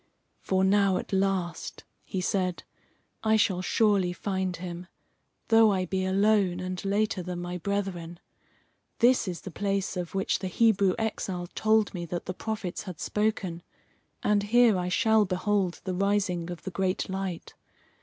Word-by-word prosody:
"For 190 0 0
now 195 -1 +3
at - - -6
last," 190 -3 -1 0.2
he 190 - -4
said, 185 -1 -1 0.6
"I 220 0 +4
shall 190 -4 +2
surely 195 -2 +2
find 190 -1 -2
him, 175 0 -7 0.6
though 225 -1 +6
I 185 -2 0
be 190 +1 -1
alone, 195 -1 +2
and 185 0 -4
later 200 0 0
than 180 0 -5
my 175 0 -4
brethren. 175 -3 -3 0.8
This 245 -2 +4
is 175 -2 -4
the 190 - -8
place 195 0 -1
of 180 0 -4
which 195 - 0
the 190 - -3
Hebrew 200 -1 +3
exile 190 -5 -2
told 220 -1 +2
me 175 -2 -4
that 175 +1 -4
the 185 - -3
prophets 210 -3 -4
had 180 -5 -7
spoken, 205 -5 -1 0.6
and 210 -1 +3
here 230 +1 +4
I 180 0 -1
shall 220 +3 +4
behold 190 -1 0
the 185 - -3
rising 190 -3 0
of 175 -1 -7
the 190 - -5
great 185 +1 -1
light. 190 -2 -4
190 Hz, 155 wpm, -28 LUFS, 180-205 Hz, 0.8 s, though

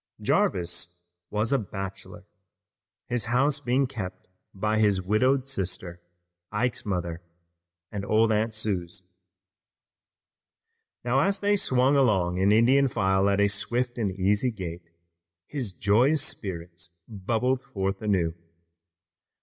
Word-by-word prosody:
Jarvis 90 0 0 0.3
was 105 +4 0
a 135 - +3
bachelor, 95 -2 -7 0.8
his 120 -2 -1
house 135 +5 +2
being 135 0 +1
kept 95 -8 -7 0.2
by 105 +2 0
his 105 -3 +3
widowed 125 +8 +2
sister, 90 -7 -4 0.5
Ike's 115 +2 -1
mother, 85 -3 -2 0.7
and 100 -1 -4
old 110 +2 +3
Aunt 110 +1 +1
Suse. 95 -3 -4 1.9
Now, 125 +2 +2
as 195 +7 +2
they 205 +1 +2
swung 130 -6 +2
along 95 -9 +2
in 95 +2 +4
Indian 130 +6 +5
file 95 -4 +2
at 100 0 +1
a 100 - +5
swift 120 +5 -1
and 105 -4 +1
easy 100 +6 +1
gait, 85 -6 -7 0.6
his 130 -6 -4
joyous 120 - +3
spirits 85 - -6 0.2
bubbled 115 +5 -1
forth 95 -7 -3
anew. 95 -6 +1
105 Hz, 115 wpm, -26 LUFS, 95-125 Hz, 1.9 s, Indian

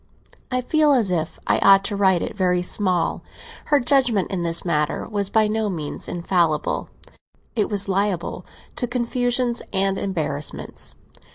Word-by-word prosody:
I 255 0 +1
feel 300 +3 +3
as 225 -8 +2
if 165 -2 -2
I - - +2
ought 195 0 +6
to 205 0 -2
write 190 -3 +3
it - - -5
very 180 -2 +1
small, 180 -2 0 0.4
her 290 -1 +3
judgement 245 -6 +2
in 190 -3 -2
this 170 +1 0
matter 150 -3 0
was 200 -3 -1
by 220 0 +3
no 215 0 -1
means 155 -6 -4
infallible; 170 -3 0 0.7
it 215 -3 +1
was 205 -2 0
liable 195 -2 -1 0.3
to 245 - -1
confusions 245 0 0
and 195 0 0
embarrassments. 155 -6 -4
195 Hz, 150 wpm, -22 LUFS, 175-235 Hz, 0.7 s, ought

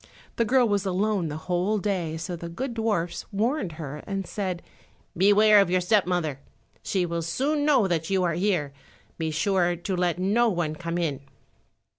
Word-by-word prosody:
The 230 - +2
girl 250 +1 +4
was 205 -2 +1
alone 195 -1 0
the 150 0 -4
whole 180 +5 0
day, 180 -6 -2
so 175 +2 -4
the 170 0 -7
good 245 +9 -4
dwarfs 215 -7 -2
warned 210 - -1
her 150 -3 -6
and 195 -1 -3
said, 185 -2 -4 0.5
"Beware 205 +3 +6
of 195 - +1
your 185 +1 +3
step 185 +1 +2
mother, 160 -7 -1 0.4
she 185 -3 0
will 170 -1 -2
soon 280 - 0
know 265 -9 +4
that 165 -3 -1
you 190 -1 +2
are 170 -2 +1
here; 175 -6 0 0.5
be 160 -1 -1
sure 175 +2 +1
to 185 +3 -3
let 175 -1 0
no 210 +6 +2
one 170 -6 -1
come 170 +2 -4
in." 160 -6 -1
185 Hz, 180 wpm, -26 LUFS, 170-210 Hz, 0.5 s, Beware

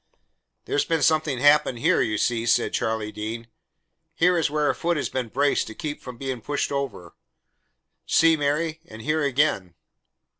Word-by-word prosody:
"There's 145 - +1
been 165 +1 0
something 155 -4 +2
happened 145 -1 +4
here, 115 - +2
you 110 -1 0
see," 115 +1 0
said - - +2
Charlie 110 -1 -2
Dean. 115 +2 -6 0.7
"Here 180 +2 +3
is 165 -4 +1
where 150 0 0
a - - +2
foot 170 -1 -1
has 145 - -2
been 130 -2 -3
braced 140 +5 +1
to 110 - -9
keep 150 -2 -5
from 125 -2 -9
being 130 -2 -4
pushed 145 +6 -2
over; 135 -11 -4 0.9
see, 165 0 +4
Mary? 155 +2 -1
And 110 0 -11
here 155 +1 0
again." 130 - 0
140 Hz, 165 wpm, -24 LUFS, 115-155 Hz, 0.9 s, happened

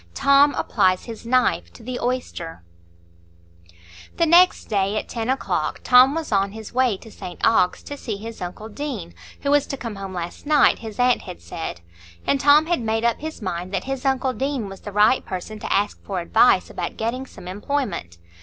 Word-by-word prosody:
Tom 280 +1 +5
Applies 185 0 +1
His 230 -1 -9
Knife 235 - +2
to - - -14
the 250 +1 -4
Oyster 215 - -4 1.5
The 335 - +3
next 350 +3 +5
day, 200 0 0
at - - -3
ten 230 0 -4
o'clock, 265 - -1
Tom 255 +3 +6
was 325 -5 -4
on 195 -1 +1
his 220 0 -9
way 250 -5 +2
to 225 - -14
St 180 - -9
Ogg's, 225 -5 +3
to 285 - -7
see 225 -7 -5
his 225 +2 -9
uncle 180 +5 -6
Deane, 225 - -6 0.3
who 280 - 0
was 290 -1 +3
to 275 - -4
come 230 -5 -6
home 195 -1 -6
last 175 - -6
night, 295 -2 +4
his 220 -2 -8
aunt 250 0 +3
had - - -9
said; 85 0 -6 0.4
and 275 - +2
Tom 290 +3 +6
had 340 -4 0
made 225 0 -1
up 235 - +1
his 315 -6 -7
mind 180 -1 -4
that 185 - -2
his 270 -1 -4
uncle 265 -1 +1
Deane 265 -5 -2
was 195 - -10
the 205 - -7
right 210 +5 +4
person 190 +4 -6
to - - -5
ask 205 +1 0
for 195 -3 -3
advice 185 +2 +3
about 175 - -5
getting 250 +4 -3
some 180 - -12
employment. 195 - -3
225 Hz, 195 wpm, -22 LUFS, 195-270 Hz, 1.5 s, Tom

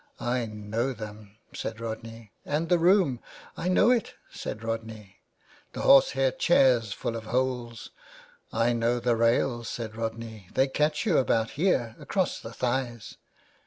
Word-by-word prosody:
" - - -34 0.2
I 120 -2 -1
know 110 +4 -3
them," 105 -2 -10 0.2
said 110 0 -5
Rodney. 115 -1 -7
" - - -44
And 155 +3 -2
the 175 -1 +4
room—" 175 - +4 0.2
*' - - -18
I 175 - -4
know 200 +6 +5
it," 240 -4 0 0.2
said 110 - -6
Rodney. 110 -4 -5 0.3
*' - - -29
The - - -5
horse 135 - +6
hair 135 -1 +2
chairs 125 -10 +3
full 115 - -3
of 110 -1 -6
holes.'' 125 -1 -2
'^ - - -34 0.5
I 115 +2 +2
know 120 +1 +1
the 120 0 +1
rails," 115 +1 +1
said 110 -2 -5
Rodney, 110 -3 -5
'* - - -21
they 135 +1 +4
catch 150 +6 0
you 185 -8 +3
about 115 -3 +1
here, 130 -9 0
across 190 -2 -1
the 115 - -9
thighs." 120 -1 -3
115 Hz, 175 wpm, -27 LUFS, 110-135 Hz, 0.5 s, horse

